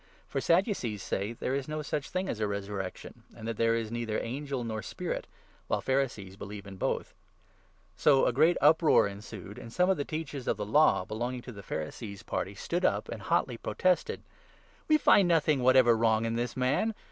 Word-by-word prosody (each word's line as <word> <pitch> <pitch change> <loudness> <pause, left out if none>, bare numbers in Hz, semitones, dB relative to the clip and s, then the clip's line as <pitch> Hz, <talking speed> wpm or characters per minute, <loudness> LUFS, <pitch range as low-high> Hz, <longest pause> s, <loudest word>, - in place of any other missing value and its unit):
(For 135 - -2
Sadducees 165 - +1
say 100 +4 -2
there 125 +2 -3
is 140 -1 -2
no 155 0 -3
such 145 0 -3
8 - - -14
thing 185 +1 -2
as 110 - -3
a 105 - +1
resurrection, 100 -2 -5 0.2
and 110 -1 -7
that 115 -2 -3
there 115 0 +3
is 115 -1 -3
neither 115 -2 -2
angel 135 +1 -3
nor 110 -2 -3
spirit, - - -4 0.4
while - - 0
Pharisees 120 -8 -1
believe 100 0 -8
in 95 -1 -9
both.) - - -2 0.8
So 140 -3 +5
a - - +2
great 160 +7 +4
uproar 155 +3 +6
9 100 0 -7
ensued, 100 -1 -9
and 115 - -10
some 180 +8 +3
of 190 - +1
the 145 - -1
Teachers 145 -4 -5
of 115 - +1
the 105 - -3
Law 130 -3 +4
belonging 120 +4 -4
to 125 - -8
the 100 -3 -10
Pharisees' 100 +5 -6
party - - -3
stood - - -2
up - - +1
and - - -6
hotly - - 0
protested: 185 -1 0 0.3
" - - -31
We 310 - +6
find 200 -10 +5
nothing 155 -5 +3
whatever 130 -2 +6
wrong 110 0 +2
in 115 0 -1
this 120 +1 -2
man. 140 - +1
120 Hz, 205 wpm, -30 LUFS, 105-150 Hz, 0.8 s, uproar